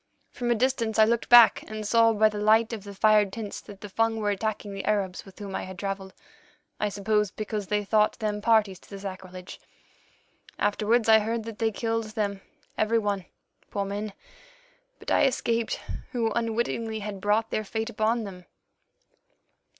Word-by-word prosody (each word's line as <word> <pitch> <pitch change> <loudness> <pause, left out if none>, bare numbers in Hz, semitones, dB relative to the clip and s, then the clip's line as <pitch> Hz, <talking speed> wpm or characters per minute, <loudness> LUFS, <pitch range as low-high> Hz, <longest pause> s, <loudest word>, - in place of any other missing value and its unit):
From 240 -1 -3
a 240 - +4
distance 230 -2 0
I 220 - +7
looked 235 +1 0
back 240 -1 +8
and 215 0 -6
saw 230 +1 +5
by 215 0 +4
the 210 -1 -3
light 220 +2 +4
of 215 -3 -5
the 200 0 -9
fired 210 -1 +4
tents 210 -1 -6
that 200 -2 -13
the 210 - -6
Fung 225 +3 +1
were 210 -1 0
attacking 205 0 -3
the 195 - -5
Arabs 195 -3 -1
with 195 - -15
whom 200 -2 -7
I - - -2
had 185 0 -8
travelled, 195 0 -5 0.6
I 210 - 0
suppose 210 +1 0
because 210 0 -4
they 210 +1 0
thought 215 +1 +2
them 210 -1 -2
parties 215 -4 +3
to - - -20
the 200 - -7
sacrilege. 185 -2 -8 1.0
Afterwards 215 +3 +1
I 220 0 +7
heard 225 +1 -2
that 225 -1 -8
they 225 -1 +2
killed 225 +1 -2
them 205 -2 -3 0.4
every 220 +2 +2
one, 205 -4 -1 0.4
poor 200 -1 -2
men, 205 +1 -4 0.8
but - - -7
I - - +4
escaped, 235 -3 0 0.3
who 230 -3 0
unwittingly 230 -1 -1
had 200 -2 -6
brought 210 +2 +1
their 215 - -1
fate 220 +3 -3
upon 220 +2 0
them. 185 -3 -9
215 Hz, 180 wpm, -27 LUFS, 200-225 Hz, 1.0 s, back